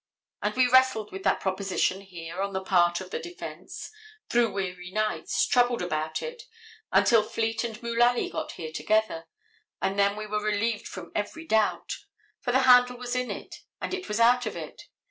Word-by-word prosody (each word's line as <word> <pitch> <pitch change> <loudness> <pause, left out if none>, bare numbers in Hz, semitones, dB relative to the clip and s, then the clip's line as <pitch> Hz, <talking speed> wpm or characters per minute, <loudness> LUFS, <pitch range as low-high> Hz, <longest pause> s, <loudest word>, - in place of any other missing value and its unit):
And - - -1
we 255 0 +5
wrestled 260 -4 +4
with 190 - -6
that - - +3
proposition 190 0 0
here, 175 -2 -7
on 200 0 -2
the 190 - -1
part 175 -2 +3
of 185 0 -9
the - - -2
defense, 355 0 -8 0.4
through 235 -2 +3
weary 180 -2 -4
nights, 215 +2 0
troubled 245 -4 +2
about 155 -2 -2
it, 480 0 -6 0.5
until 230 -2 +5
Fleet 225 +1 -1
and 225 -2 -4
Mullaly 240 +1 +2
got - - -4
here 160 -2 -6
together, 215 -4 0 0.5
and 195 +1 -1
then 200 0 +3
we 215 0 -5
were 210 0 -2
relieved 215 +1 0
from 180 -3 -8
every 265 +11 -3
doubt. 220 -7 +1 0.4
For 245 - -1
the 260 +2 +4
handle 250 -1 +6
is 245 0 -2
in 250 0 -1
it, - - -7 0.2
and - - -4
it 375 0 -4
is 210 +1 -1
out 245 +1 +5
of - - -4
it. - - -8
215 Hz, 185 wpm, -27 LUFS, 190-245 Hz, 0.5 s, handle